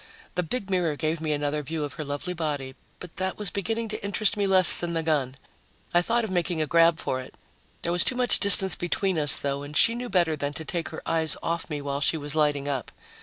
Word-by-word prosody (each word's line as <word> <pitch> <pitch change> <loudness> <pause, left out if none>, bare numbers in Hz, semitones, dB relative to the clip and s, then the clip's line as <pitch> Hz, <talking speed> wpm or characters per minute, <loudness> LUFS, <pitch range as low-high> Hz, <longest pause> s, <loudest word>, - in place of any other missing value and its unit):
The 180 - -1
big 195 +3 -5
mirror 175 -5 0
gave 155 +1 -3
me 155 -1 -3
another 145 0 -2
view 155 +2 -5
of 145 - -6
her 155 - -6
lovely 145 +5 -5
body, 145 -5 -4 0.3
but 180 -2 -12
that 190 0 -3
was 210 -3 -1
beginning 225 +3 -3
to 215 - -6
interest 200 +2 0
me 205 -1 -1
less 185 -2 +5
than 170 -1 -4
the 165 -1 -2
gun. 140 -5 -1 0.6
I 175 - +4
thought 235 +6 -1
of 220 - -5
making 175 -2 -2
a 155 - 0
grab 165 +1 +3
for 130 -4 -3
it. 130 - -14 0.5
There 170 - 0
was 175 0 +2
too 255 - -1
much 250 -1 +5
distance 195 -1 +9
between 175 0 -2
us, 145 -2 +6
though, 140 0 -3
and 145 +1 -6
she 230 - +5
knew 245 +1 -6
better 170 -6 +1
than 145 -1 -5
to 160 - -7
take 170 0 -4
her - - -9
eyes 160 -1 -1
off 170 0 -4
me 150 -2 -5
while 140 0 -4
she 160 - +1
was 145 -1 -5
lighting 145 -2 0
up. 135 -5 -4
165 Hz, 245 wpm, -25 LUFS, 145-185 Hz, 0.6 s, distance